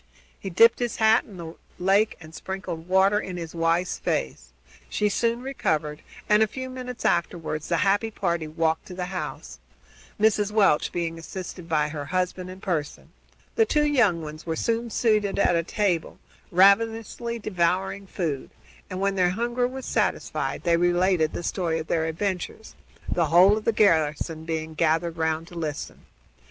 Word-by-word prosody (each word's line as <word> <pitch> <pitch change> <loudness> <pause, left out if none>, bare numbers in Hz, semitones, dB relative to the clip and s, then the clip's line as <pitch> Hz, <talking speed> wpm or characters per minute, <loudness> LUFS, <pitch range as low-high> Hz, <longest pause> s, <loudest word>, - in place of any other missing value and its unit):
He 195 - -5
dipped 230 +6 +5
his 240 -2 -1
hat 220 0 +4
in 200 - -12
the 165 -1 -7 0.2
lake 195 +4 +2
and 160 -1 -13
sprinkled 180 -3 -6
water 190 +2 +4
in 185 -3 -6
his 165 -2 -6
wife's 170 +2 0
face. 65 -2 -2 0.4
She 210 - +1
soon 235 +3 0
recovered 155 - -2 0.3
and, 210 0 +4
a 220 - +5
few 260 +4 -6
minutes 250 -1 -7
afterward, 165 -2 0
the 170 +2 -1
happy 205 +3 +2
party 170 -6 -2
walked 160 +1 0
up - - -34
to 185 - -8
the 180 -1 -3
house, 65 - -6 0.6
Mrs. 210 -1 +3
Welch 200 -8 +3
being 165 -1 -3
assisted 180 +1 -8
by 150 -2 +1
her 145 -1 -5
husband 185 +2 -2
and 185 +1 -11
Pearson. 155 -6 -3 0.4
The 450 -1 +3
two 300 0 +2
young 220 - +3
ones 155 +1 -8
were 165 -1 -3
soon 230 +5 -1
seated 215 -3 +1
at 175 - +3
a 170 - +3
table, 180 -1 -1 0.3
ravenously 225 +5 +3
devouring 190 -1 -1
food, 160 -8 -3 0.4
and, 185 - -5
when 200 0 +1
their 185 -2 +2
hunger 240 +5 0
was 260 +1 -7
satisfied, - - -1
they 170 -1 +3
related 175 -2 +2
the - - -4
story 170 -2 -1
of 160 - -4
their 160 0 0
adventures, 185 +5 -4 0.3
the 170 -2 +1
whole 180 +6 +6
of 215 - -5
the - - +4
garrison 160 -5 +1
being 160 -1 -3
gathered 165 +1 +1
round 160 0 -1
to 175 - -12
listen. 150 -3 -5
180 Hz, 170 wpm, -25 LUFS, 165-210 Hz, 0.6 s, whole